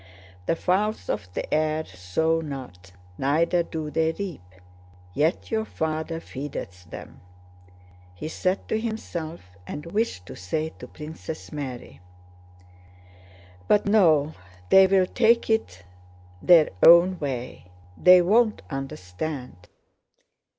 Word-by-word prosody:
"The - - +2
fowls 205 +6 0
of 90 -2 -3
the - - -2
air 155 0 +1
sow 95 - -1
not, 125 - -8 0.3
neither 165 +6 +2
do 160 -2 -5
they 160 +2 +1
reap, 185 - -6 0.7
yet 155 - 0
your 220 -1 +1
Father 160 -4 -3
feedeth 125 - -7
them," - - -10 0.9
he 90 - -6
said 185 +4 -2
to 220 - 0
himself 170 - -6
and 150 - -6
wished 205 - -1
to - - -9
say 155 - -3
to - - -9
Princess 155 +1 -8
Mary; 125 - -7 1.7
"but 205 - +3
no, 160 -8 +4 0.4
they 190 0 +8
will 190 -1 +4
take 230 +3 +2
it 95 - -1 0.6
their 170 -3 +6
own 175 +2 +7
way, 130 -9 -5 0.3
they 180 - +7
won't 215 +4 +2
understand! 125 - -6
160 Hz, 115 wpm, -25 LUFS, 135-185 Hz, 1.7 s, they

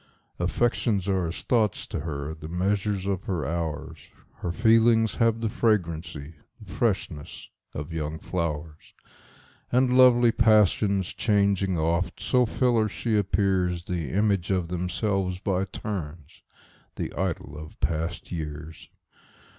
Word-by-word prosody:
Affections 115 -5 0
are 95 -3 +1
as 80 - -5
thoughts 110 -5 +1
to - - -4
her, 75 -1 -4
the 80 -1 -9
measures 95 +3 -1
of 100 -1 -2
her 85 -7 -2
hours; 80 -1 -4 0.3
Her 85 - -3
feelings 115 +2 +4
have 115 -1 +2
the 115 - 0
fragrancy, 85 -9 -1 0.3
the 105 -5 -12
freshness, 95 -9 -2 0.2
of 75 +3 -5
young 80 -1 -3
flowers; 80 -3 -4 0.8
And 125 0 +3
lovely 120 -2 +6
passions, 105 -4 +3
changing 100 -3 +1
oft, 85 +3 0
so 125 -2 +2
fill 125 +1 +2
her, 110 -1 +1
she 115 +3 -2
appearsThe 90 -5 0
image 100 -2 +1
of 90 -3 0
themselves 90 +1 -1
by 95 0 0
turns,—the 85 -6 -8
idol 75 - -3
of 75 0 -10
past 80 +1 -2
years! 80 -1 -6
95 Hz, 125 wpm, -26 LUFS, 80-105 Hz, 0.8 s, lovely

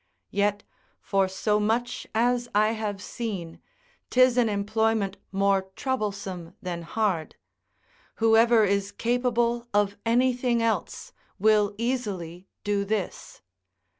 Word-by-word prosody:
Yet, 205 0 0 0.4
for 195 -1 +1
so 210 +3 0
much 225 +3 -1
as 240 +1 +1
I 215 +1 +4
have 210 -3 -4
seen, 190 -8 -5 0.5
'tis 255 -1 +5
an 240 -3 +3
employment 210 -1 0
more 195 -1 +1
troublesome 200 -8 -3
than 175 -2 -4
hard; 175 -2 -1 0.8
whoever 225 0 +5
is 200 0 0
capable 240 0 0
of 205 -1 +2
anything 245 +1 +2
else, 230 - -2 0.2
will 210 0 +3
easily 200 -8 -3 0.2
do 205 -1 0
this. 200 -2 -4
215 Hz, 105 wpm, -26 LUFS, 195-235 Hz, 0.8 s, tis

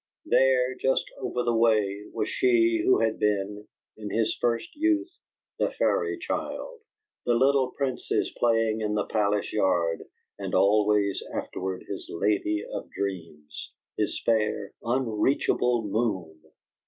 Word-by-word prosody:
There, 130 -1 +3
just 130 +1 +1
over 125 - -2
the 120 -1 +1
way, 105 -3 +2
was 110 -2 -2
she 115 -2 +3
who 130 - +4
had 110 -1 0
been, 105 0 -1 0.3
in 105 -1 -6
his 110 0 0
first 115 -1 -1
youth, 330 +3 +1 0.4
the - - +2
fairy 430 -6 0
child, 475 +6 -4 0.4
the 120 - +2
little 135 +1 +3
princess 135 -3 -1
playing 115 -2 +2
in 105 -1 -1
the 105 - 0
palace 105 -1 0
yard, 85 -5 +1 0.4
and - - -3
always 105 0 +3
afterward 95 0 -4
his - - -6
lady 105 +3 0
of - - -6
dreams, 80 -6 -6 0.2
his - - -1
fair 105 -3 0
unreachable 120 0 +1
moon! 95 -8 -3
110 Hz, 130 wpm, -27 LUFS, 100-125 Hz, 0.4 s, who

